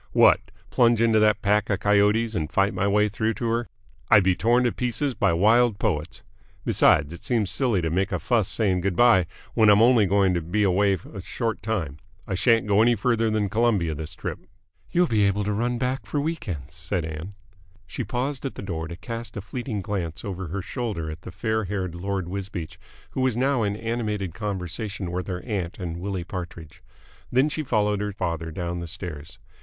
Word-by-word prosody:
"What! - - +5 0.2
Plunge 120 -2 +4
into 115 -1 +4
that 105 -1 +3
pack 105 +1 +2
of 100 -1 +1
coyotes 105 +2 +3
and 80 -7 -2
fight 100 +1 +2
my 100 - 0
way 105 +1 +3
through 110 +2 -1
to 120 - -4
her! 115 +1 0 0.4
I'd 100 - +7
be 95 -1 +3
torn 120 +5 +3
to 120 - +2
pieces 125 +4 -1
by - - +2
wild 110 +5 +4
poets. 75 -4 -2 0.4
Besides, 75 +2 +3
it 85 - -10
seems 110 -6 0
silly 115 -10 +1
to 80 - -1
make 95 +5 0
a - - 0
fuss 115 -6 +1
saying 95 -5 +1
good 95 0 -1
bye 115 -7 +5 0.3
when 110 -2 +5
I'm 105 0 +7
only 120 -4 +5
going 95 -1 +3
to 85 - 0
be 90 +7 0
away 100 0 +3 0.2
a 100 - -6
short 115 +4 -3
time. 85 -11 -3 0.3
I - - -2
shan't 115 +4 +3
go 105 0 +3
any 120 +1 +4
further 115 0 +1
than 110 -1 +1
Colombia 105 -6 +1
this 75 0 -6
trip." - - -5 0.5
"You'll 180 +1 +3
be 110 -9 +2
able 100 +1 +1
to 105 +1 -1
run 120 +3 0
back 130 +3 -2
for 145 - -1
week 160 0 -3
ends," 75 -6 -5
said 80 +2 -3
Ann. 80 +5 -7 0.5
She 125 - -5
paused 130 +5 -3
at 135 - -4
the - - -7
door 80 -4 -4
to 85 - -7
cast 115 +3 -6
a - - -1
fleeting 110 0 -4
glance 90 -6 -4
over 95 -2 -4
her 95 +4 -4
shoulder 100 - -3
at 80 +1 -9
the - - -9
fair 110 +4 -1
haired 95 -3 -3
Lord 95 0 -3
Wisbeach, 95 -3 -6 0.3
who 130 - -2
was 130 -3 +1
now 135 0 +2
in 100 -1 0
animated 105 -5 -3
conversation 95 +1 -4
with 90 +1 -3
her 90 -2 -4
aunt 95 -6 -3
and 85 -3 -5
Willie 95 -1 -3
Partridge; 85 -3 -8 0.5
then 130 +5 +3
she 155 - -3
followed 105 -6 +1
her 105 0 -2
father 85 -4 -3
down 85 +2 -4
the 85 - -5
stairs. 80 -3 -8
100 Hz, 205 wpm, -25 LUFS, 90-115 Hz, 0.5 s, I'd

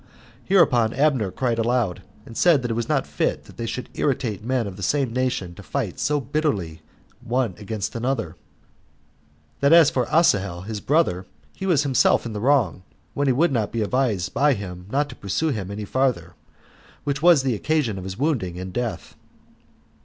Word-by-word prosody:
Hereupon 130 - +4
Abner 135 -7 +2
cried 120 +3 -1
aloud, 115 -6 0 0.2
and 115 - -11
said 160 -4 +4
that 120 - -2
it - - +1
was 115 0 -3
not - - +1
fit - - -1
that - - -16
they 115 - -4
should 120 +3 -4
irritate 120 -7 -1
men 125 0 0
of 100 -2 -6
the 100 - -10
same 130 +4 0
nation 125 -8 -1
to - - -12
fight - - -4
so 150 +1 +1
bitterly 120 - -2 0.4
one 120 -4 0
against 105 -1 -4
another; 115 -8 -2 1.2
that 140 +1 +3
as 165 -3 +7
for 125 -2 0
Asahel 100 - +2
his 105 +2 -6
brother, 130 - +1 0.3
he 190 - -4
was 160 -6 +3
himself 135 -3 +3
in 115 - -5
the 105 - -4
wrong, 125 - +2 0.3
when 145 0 0
he 130 - +4
would 160 +6 +2
not 115 -5 -1
be 115 -2 -1
advised 110 -6 0
by 145 -1 +3
him 90 -3 -8
not 145 +5 +1
to 125 - -9
pursue 105 - -1
him 105 -9 -3
any 105 +1 -5
farther, 115 -9 0 0.7
which 140 0 -2
was 170 -5 +6
the 130 -2 +1
occasion 125 -3 0
of - - -7
his 95 0 -6
wounding 125 - -1
and 95 0 -6
death. 120 -2 -4
120 Hz, 185 wpm, -23 LUFS, 100-140 Hz, 1.2 s, as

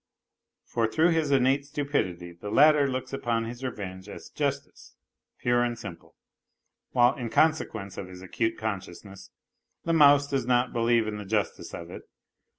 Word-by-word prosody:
For 115 -1 0
through 160 +9 +2
his 160 -3 +1
innate 135 0 +3
stupidity 140 - -2
the 90 +4 -8
latter 145 +4 +5
looks 130 0 -4
upon 115 -4 -1
his 120 +3 -8
revenge 100 -6 -6
as - - -10
justice - - -4 0.4
pure 120 0 +1
and 120 -1 -2
simple; 85 -7 -10 0.7
while 120 -1 +4
in 120 -4 -5
consequence 110 - 0
of 95 - -6
his 90 0 -11
acute 115 +4 -2
consciousness 100 -2 -6 0.5
the 165 - 0
mouse 145 -2 +6
does 135 -4 -2
not 125 0 +2
believe 115 -1 +2
in 105 -1 -4
the 105 - -6
justice 105 +1 -2
of 85 0 -9
it. - - -8
120 Hz, 155 wpm, -27 LUFS, 100-140 Hz, 0.7 s, mouse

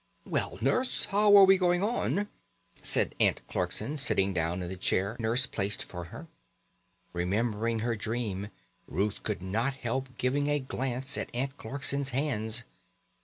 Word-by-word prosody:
"Well, - - -2
Nurse, 255 0 +1
and - - +1
how 205 0 +6
are 195 - +10
we 190 0 +5
going 180 0 +2
on?" 205 -2 0 0.5
said - - +2
Aunt - - +3
Clarkson, 150 +2 -1
sitting 100 -8 +2
down 85 +1 -1
in - - -4
the 95 - -4
chair 95 +3 0
Nurse 115 +3 +3
placed 100 -3 -2
for 90 -1 -7
her. 120 - -10 0.9
Remembering 110 +5 0
her 120 +1 0
dream, 105 -3 -3 0.4
Ruth 100 +5 -1
could 100 -4 -3
not 115 +8 -1
help 130 0 -4
giving 140 +3 +1
a 145 0 +2
glance 130 0 -3
at - - -4
Aunt 135 +2 -1
Clarkson's 140 +2 -1
hands. 120 -4 0
120 Hz, 155 wpm, -29 LUFS, 105-140 Hz, 0.9 s, are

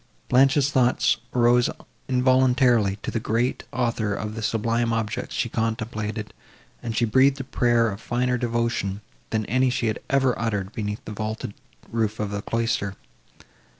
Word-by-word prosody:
Blanche's 135 +2 +4
thoughts 130 -3 +3
arose 120 0 +4 0.4
involuntarily 125 -4 +3
to - - -3
the 115 - -1
Great 115 +4 -1
Author 115 -4 -1
of 105 +2 -4
the 115 - -5
sublime 115 +2 0
objects 110 -2 -2
she - - 0
contemplated, 110 -2 -3 0.5
and 115 -2 -4
she 120 - +3
breathed 135 +5 +4
a - - -3
prayer 120 -3 +2
of 100 +3 -8
finer 125 +1 0
devotion, 115 -4 -1 0.3
than 110 -1 -1
any 130 +4 +2
she 125 -1 -1
had 110 -1 -1
ever 135 -2 +3
uttered 100 -4 -2
beneath 105 -2 -4
the - - -6
vaulted 110 -1 -4 0.4
roof 110 -2 -1
of 105 -1 -2
a 100 - -2
cloister. 115 -3 -1
115 Hz, 150 wpm, -24 LUFS, 110-125 Hz, 0.5 s, Blanche's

